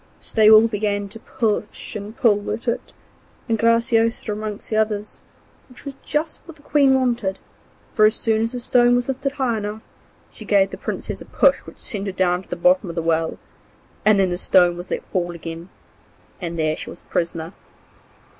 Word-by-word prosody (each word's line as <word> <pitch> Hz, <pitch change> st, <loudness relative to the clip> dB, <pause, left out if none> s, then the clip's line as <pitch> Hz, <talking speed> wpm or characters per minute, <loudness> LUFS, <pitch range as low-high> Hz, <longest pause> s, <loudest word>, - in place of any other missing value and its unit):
So -, -, -9 dB
they 215 Hz, -1 st, +6 dB
all 220 Hz, +1 st, +8 dB
began 205 Hz, -2 st, -2 dB
to 225 Hz, +3 st, -8 dB
push 220 Hz, 0 st, -2 dB
and 210 Hz, +2 st, -7 dB
pull 205 Hz, -3 st, +2 dB
at 230 Hz, -, -4 dB
it, 235 Hz, -, -2 dB, 0.6 s
and 225 Hz, -2 st, 0 dB
Graciosa 230 Hz, -1 st, +2 dB
among 210 Hz, 0 st, -4 dB
the 220 Hz, -, -2 dB
others, 215 Hz, -1 st, -1 dB, 0.5 s
which 250 Hz, -, -13 dB
was 280 Hz, -, -5 dB
just 305 Hz, +2 st, -2 dB
what 330 Hz, -, -11 dB
the 290 Hz, -, -21 dB
Queen 280 Hz, -3 st, +4 dB
wanted; 235 Hz, -7 st, 0 dB, 0.6 s
for 215 Hz, -, +5 dB
as 215 Hz, +2 st, +4 dB
soon 220 Hz, -1 st, +1 dB
as 225 Hz, +1 st, -1 dB
the 250 Hz, -, -3 dB
stone 245 Hz, 0 st, +4 dB
was 245 Hz, 0 st, 0 dB
lifted 270 Hz, +1 st, -2 dB
high 255 Hz, -6 st, 0 dB
enough, 210 Hz, +1 st, -5 dB, 0.5 s
she -, -, -11 dB
gave 200 Hz, -2 st, +3 dB
the -, -, -6 dB
Princess -, -, -4 dB
a -, -, -9 dB
push -, -, +3 dB
which -, -, -12 dB
sent 205 Hz, -4 st, -4 dB
her 195 Hz, -, -3 dB
down 180 Hz, -1 st, +1 dB
to -, -, -20 dB
the -, -, -3 dB
bottom 270 Hz, -8 st, +3 dB
of 170 Hz, -, -6 dB
the 165 Hz, -, -2 dB
well, 165 Hz, 0 st, 0 dB, 0.7 s
and 215 Hz, -2 st, +5 dB
then 190 Hz, -2 st, +2 dB
the 175 Hz, -, -2 dB
stone 180 Hz, -2 st, +4 dB
was 175 Hz, +1 st, -8 dB
let -, -, -3 dB
fall 175 Hz, -2 st, -1 dB
again, 165 Hz, +1 st, -8 dB, 0.7 s
and 170 Hz, -1 st, -4 dB
there 155 Hz, -1 st, +1 dB
she -, -, -8 dB
was -, -, -10 dB
a -, -, -31 dB
prisoner. 165 Hz, 0 st, -3 dB
215 Hz, 200 wpm, -22 LUFS, 190-235 Hz, 0.7 s, all